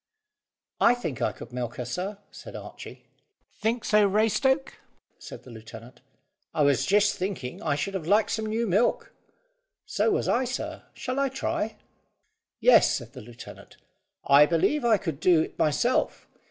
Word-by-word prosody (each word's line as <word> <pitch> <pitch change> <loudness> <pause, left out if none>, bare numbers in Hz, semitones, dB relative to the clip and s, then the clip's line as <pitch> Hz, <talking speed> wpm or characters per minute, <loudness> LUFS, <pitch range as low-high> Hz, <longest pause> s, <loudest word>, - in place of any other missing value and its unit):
"I 245 - +5
think 155 - -5
I - - +1
could 120 - -12
milk 125 -2 -4
her, 125 - -5
sir," 185 - -4
said - - -11
Archy. - - -10 0.6
"Think 225 +2 -1
so, 210 -1 +4
Raystoke?" 225 +7 +1 0.5
said - - -10
the 125 - -13
lieutenant. 115 +2 -12 0.5
"I 150 - +3
was 140 -3 +2
just 205 +1 +3
thinking 180 -9 -4
I - - 0
should 150 +7 -3
have 175 -5 -4
liked 210 +3 +3
some 220 0 -2
new 225 +2 -1
milk." 205 +4 +1 0.7
"So - - 0
was 415 - 0
I, 250 - +2
sir. 250 +2 -5
Shall 255 +2 -3
I 275 -1 +1
try?" 225 -4 -3 0.8
"Yes," - - +5
said 120 -2 -7
the 130 - -9
lieutenant. 120 +1 -13 0.5
"I 140 +2 +7
believe 175 - +1
I 230 -3 +4
could 165 -8 -5
do 170 -1 +4
it - - -6
myself. 235 - +1
195 Hz, 160 wpm, -26 LUFS, 140-225 Hz, 0.8 s, I